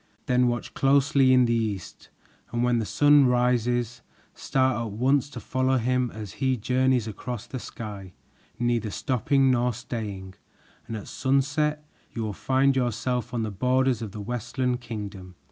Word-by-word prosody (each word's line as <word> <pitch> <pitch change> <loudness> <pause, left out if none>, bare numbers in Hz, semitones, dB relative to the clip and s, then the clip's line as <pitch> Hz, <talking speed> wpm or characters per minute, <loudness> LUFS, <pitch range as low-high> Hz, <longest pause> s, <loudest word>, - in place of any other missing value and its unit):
"Then 125 0 +3
watch 120 0 -3
closely 135 -1 +3
in 130 -1 +5
the 115 - +1
east, 110 -5 -3 0.4
and 120 0 0
when 120 -1 +2
the 110 - -3
sun 145 -2 +5
rises, 120 -1 +1 0.3
start 130 -2 0
at 110 -3 -4
once 135 +3 +2
to - - -8
follow 130 0 0
him 125 +1 +1
as 105 -4 -8
he 130 -1 +2
journeys 125 +1 +1
across 120 +2 -6
the 130 +2 -6
sky, 100 -6 -8 0.4
neither 120 -2 0
stopping 135 +4 +1
nor 125 0 +1
staying, 105 -6 -6 0.5
and 115 -1 -4
at 105 - -9
sunset 150 +3 0 0.3
you 115 - -3
will 105 -1 -3
find 135 +4 +2
yourself 125 0 -1
on 120 -2 -1
the 110 - -3
borders 125 +4 +1
of 110 -3 -5
the 105 - -7
Westland 125 +3 -2
Kingdom. 100 -6 -7
125 Hz, 160 wpm, -26 LUFS, 110-130 Hz, 0.5 s, in